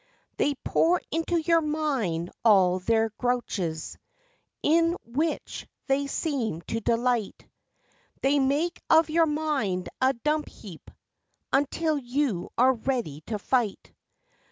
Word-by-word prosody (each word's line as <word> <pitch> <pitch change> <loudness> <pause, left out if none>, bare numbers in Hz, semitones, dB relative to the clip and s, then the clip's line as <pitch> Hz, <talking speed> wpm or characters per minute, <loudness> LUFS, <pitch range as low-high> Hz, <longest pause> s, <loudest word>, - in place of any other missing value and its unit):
They 290 - +1
pour 345 +2 +3
into 330 +2 0
your 330 +1 +3
mind 270 - -1
all 190 -5 +5
their 225 +3 +1
grouches, 200 -10 -2 0.6
In 335 +2 +3
which 300 +8 -3 0.2
they 275 +1 +1
seem 260 - -2
to 225 - -3
delight, 235 -1 -1 0.8
They 280 +2 +3
make 290 +6 0
of 320 -1 +5
your 330 0 +4
mind 290 -12 -1
a 260 +1 +4
dump 300 +5 -1
heap, 185 -7 -12 0.6
Until 295 +2 +1
you 245 -7 -1
are 255 +2 +5
ready 230 - -3
to 220 - -2
fight. 225 -1 -1
265 Hz, 115 wpm, -26 LUFS, 220-305 Hz, 0.8 s, all